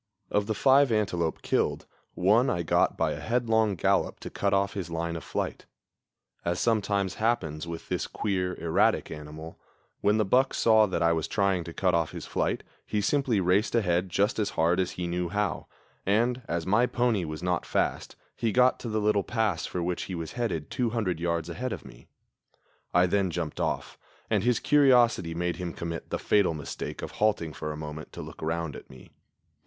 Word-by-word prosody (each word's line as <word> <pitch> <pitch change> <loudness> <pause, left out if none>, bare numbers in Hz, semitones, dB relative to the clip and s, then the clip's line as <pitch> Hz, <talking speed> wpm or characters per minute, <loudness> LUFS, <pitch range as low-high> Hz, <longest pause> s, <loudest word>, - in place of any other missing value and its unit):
Of 105 0 +1
the 110 - -1
five 135 +2 +5
antelope 90 -7 0
killed, - - 0 0.3
one 110 +8 +4
I 85 -1 0
got 80 - +2
by - - +1
a - - -4
headlong 110 -3 +1
gallop - - +1
to - - -7
cut 100 - 0
off 100 +1 +1
his 95 -4 -4
line 85 0 -2
of 85 - -6
flight. - - -4 0.8
As 85 +1 -1
sometimes 100 -4 +1
happens 85 -9 0
with 85 -1 -7
this - - -2
queer, 90 -3 -2
erratic 80 -1 +2
animal, 75 +2 -9 0.4
when 105 +1 +3
the 110 - +2
buck 130 +7 +3
saw 110 -1 +5
that 95 - -1
I 85 0 +4
was 80 -2 -1
trying 100 -4 +1
to 85 - -7
cut 90 0 +1
off 85 -1 +1
his - - -6
flight - - -1 0.2
he 105 - -2
simply 120 +1 +1
raced 95 +6 +2
ahead 90 -4 +1
just 100 +5 +1
as 105 - +1
hard 85 +3 +3
as 95 - 0
he 90 - -4
knew 85 0 -2
how, 105 +2 -2 0.4
and, 120 +5 +1
as 85 -1 -2
my 115 +6 +3
pony 120 -7 +1
was 80 +1 -6
not 90 -2 0
fast, - - -1 0.2
he 115 - 0
got 125 +4 +4
to 120 - -5
the 110 0 0
little 105 -1 +2
pass 110 -8 -1
for 90 - -3
which 90 0 -2
he 95 - -5
was 80 -2 -5
headed 95 -11 -3
200 110 -8 -1
yards 85 -1 -1
ahead 125 +9 -4
of - - -6
me. - - -14 0.8
I 90 +1 +5
then 95 +1 +1
jumped 85 -2 -4
off, - - -2 0.3
and 105 -3 +2
his 125 0 +2
curiosity 120 - +4
made 85 -1 -1
him 90 -2 -4
commit 85 0 -5
the - - -1
fatal 100 -6 +2
mistake 75 -2 -6
of - - -5
halting 105 -7 0
for 75 - -4
a 75 - -6
moment 75 0 -7
to - - -6
look - - -11
round 80 -1 -2
at - - -11
me. 65 - -14
95 Hz, 195 wpm, -28 LUFS, 85-110 Hz, 0.8 s, five